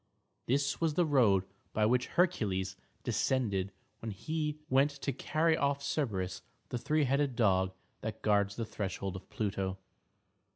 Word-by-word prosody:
This 140 +4 +1
was 160 -3 +2
the 175 - +4
road 115 -11 +4 0.3
by 110 - +3
which 125 +2 +2
Hercules 100 - +2 0.3
descended 105 -5 +1 0.3
when 115 - -5
he 150 +8 -2
went 135 +3 +4
to 140 -1 -3
carry 160 +5 +2
off 140 -1 0
Cerberus, 95 - -1 0.3
the 125 - -2
three 150 +5 +2
headed 140 -1 +1
dog 95 -5 +3 0.3
that 110 0 -5
guards 100 -1 +3
the 115 - -2
threshold 95 -2 -3
of 95 - -9
Pluto. 95 -3 -2
120 Hz, 140 wpm, -32 LUFS, 100-140 Hz, 0.3 s, the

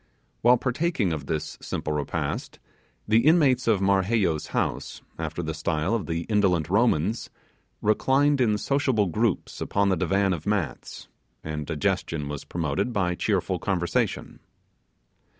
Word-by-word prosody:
While 125 +2 +6
partaking 125 - 0
of 70 -3 -5
this 80 - -3
simple 75 - -3
repast, 75 -1 -3 0.5
the 110 +1 +5
inmates 140 -4 +4
of 105 -4 +3
Marheyo's 95 -4 +1
house, - - -3 0.2
after 80 +1 -3
the 80 0 -3
style 80 +3 -1
of 115 -4 -1
the 85 0 -2
ancient 90 -7 +1
Romans, 110 -1 +1 0.5
reclined 135 +6 +3
in 105 -4 +3
sociable 130 -3 +1
groups 105 +3 -1
upon 100 0 +1
the 95 - +3
divan 95 +2 +1
of 80 0 -6
mats, 95 -11 -3 0.4
and 75 -1 -4
digestion 75 -1 -1
was 75 -1 -6
promoted 80 - -2
by 90 -5 0
cheerful 95 -1 -1
conversation. 90 -3 -1
95 Hz, 135 wpm, -26 LUFS, 80-115 Hz, 0.5 s, While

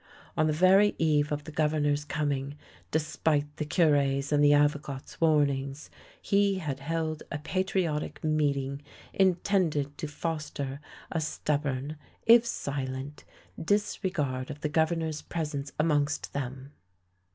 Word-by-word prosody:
On 155 - +2
the - - +2
very 190 +6 +5
eve 150 -2 +2
of 150 0 -2
the 160 - -9
Governor's 150 -1 +1
coming, 145 -1 -2 0.3
despite 150 -1 0
the 150 - -2
Cure's 145 -3 +2
and 145 0 +4
the 145 - +6
Avocat's 145 -1 0
warnings, 140 -2 +1 0.3
he 200 0 +2
had 145 -7 -3
held 160 +1 -2
a - - -2
patriotic 180 -1 -1
meeting 140 -3 0 0.3
intended 175 -6 +1
to 155 - -3
foster 145 -3 -4 0.3
a 165 - -1
stubborn, 145 -1 -2 0.3
if 235 +1 +7
silent, 135 - -4 0.4
disre 205 +1 0
gard 130 -6 -2
of 150 0 -7
the 150 - -1
Governor's 160 0 0
presence 150 -4 -4
amongst 150 -2 +1
them. 135 0 -5
150 Hz, 125 wpm, -29 LUFS, 140-160 Hz, 0.4 s, if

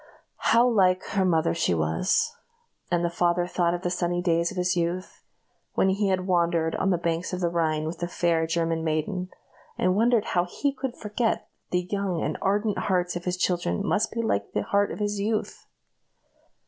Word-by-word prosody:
How 235 +2 +5
like 185 -6 +3
her 195 - +1
mother 165 -3 +2
she 165 - +1
was! 80 - +1 0.5
and 175 -1 +1
the - - +1
father 175 0 +1
thought 175 -1 0
of 175 - -7
the 175 - -1
sunny 175 0 0
days 170 -1 +1
of 195 - -8
his 180 +1 +1
youth, 175 +2 -2 0.5
when 190 - +3
he 200 +2 +1
had 185 -1 0
wandered 170 -3 +1
on 195 - +1
the 180 - +3
banks 170 +1 -2
of 180 - -2
the 175 -2 +1
Rhine 160 -2 0
with 165 +2 -5
the 175 - -2
fair 170 -2 +1
German 165 0 0
maiden, 160 +4 -1 0.5
and 185 +1 +2
wondered 230 0 +3
how 175 0 +2
he 280 +8 -1
could 260 -2 -5
forget 220 +2 -1
that - - -41 0.2
the 180 0 -1
young 195 -4 -1
and - - -1
ardent 205 +2 +1
hearts 180 -2 0
of 175 - -5
his 180 0 -1
children 175 - 0
must 215 +2 +1
be 230 0 -2
like 100 - -1
the 105 - 0
heart 200 - +1
of - - -5
his 205 -1 -1
youth. 215 +2 -2
180 Hz, 200 wpm, -26 LUFS, 170-195 Hz, 0.5 s, How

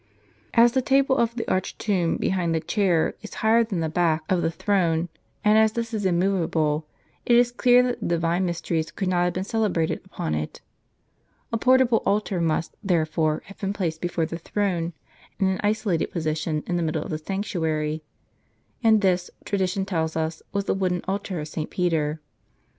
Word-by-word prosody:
As 235 +1 +7
the 260 - +1
table 270 +1 +3
of 235 -2 +1
the 230 - -3
arched 185 +1 -1
tomb 185 -6 0
behind 175 -3 0
the - - +2
chair 175 0 +1
is 215 - -9
higher 230 +1 +5
than 200 -7 -3
the 160 - 0
back 160 -1 +1
of 180 -2 +3
the 165 - +1
throne, 170 -2 0 0.4
and 210 +1 +6
as 220 0 +4
this 230 0 -3
is 205 -3 0
immovable, 170 -4 +1 0.4
it 240 - +4
is 240 0 +4
clear 245 0 +5
that 250 -1 -1
the - - -3
divine 170 +1 +1
mysteries 170 -2 -1
could 190 - -3
not 175 -1 +2
have 180 - 0
been 185 - -2
celebrated 200 -6 0
upon 80 - -4
it. 75 0 -3 0.9
A - - +2
portable 255 -2 +4
altar 200 -3 0
must, 165 0 -1
therefore, 160 -4 +1
have 200 - -14
been 195 0 -2
placed 165 -6 -2
before 175 -2 -1
the 165 +1 -6
throne, 175 -2 -1 0.5
in 195 - +2
an 190 0 +1
isolated 205 -5 +1
position 155 -1 -2
in 175 - -1
the - - 0
middle 155 -2 -1
of - - -7
the 155 - -2
sanctuary: 160 -4 -2 0.8
and 220 -2 +5
this, 180 -2 +1 0.2
tradition 190 -1 0
tell 170 -5 0
us, 160 0 -2
was 200 0 -1
the - - +1
wooden 185 -2 -1
altar 190 -2 -2
of 150 - -5
St. 155 0 -4
Peter. 160 -4 0
180 Hz, 185 wpm, -24 LUFS, 165-205 Hz, 0.9 s, As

